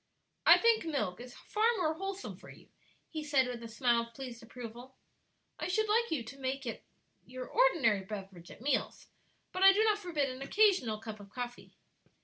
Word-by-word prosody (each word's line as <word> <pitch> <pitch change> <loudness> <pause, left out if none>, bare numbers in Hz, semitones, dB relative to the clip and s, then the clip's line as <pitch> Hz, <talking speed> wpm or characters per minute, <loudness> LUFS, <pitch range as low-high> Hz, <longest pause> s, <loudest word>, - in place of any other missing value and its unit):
"I - - +10
think 460 -1 +3
milk 260 - -2
is 245 0 -10
far 450 +2 +1
more 320 -4 +1
wholesome 390 +3 -5
for - - -14
you," - - -15 0.4
he 310 -2 -4
said, 285 -3 +3
with 245 -1 -5
a 230 - -7
smile 235 +1 +2
of 230 0 -10
pleased 250 -4 -7
approval. 240 +2 -10 0.6
"I - - -2
should 435 +4 +1
like 465 +3 +2
you 290 -7 -1
to 275 +5 -11
make 270 +1 -2
that 235 -3 -5 0.4
your 255 0 -7
ordinary 310 - +3
beverage 190 -3 -8
at - - -13
meals, 270 0 -1 0.4
but 370 - -4
I 390 0 +10
do 420 +3 +3
not 425 -1 +3
forbid 325 -8 -1
an 255 +1 -9
occasional 285 - +3
cup 220 -1 -8
of 200 -1 -12
coffee." 245 +3 -7
265 Hz, 190 wpm, -32 LUFS, 235-370 Hz, 0.6 s, I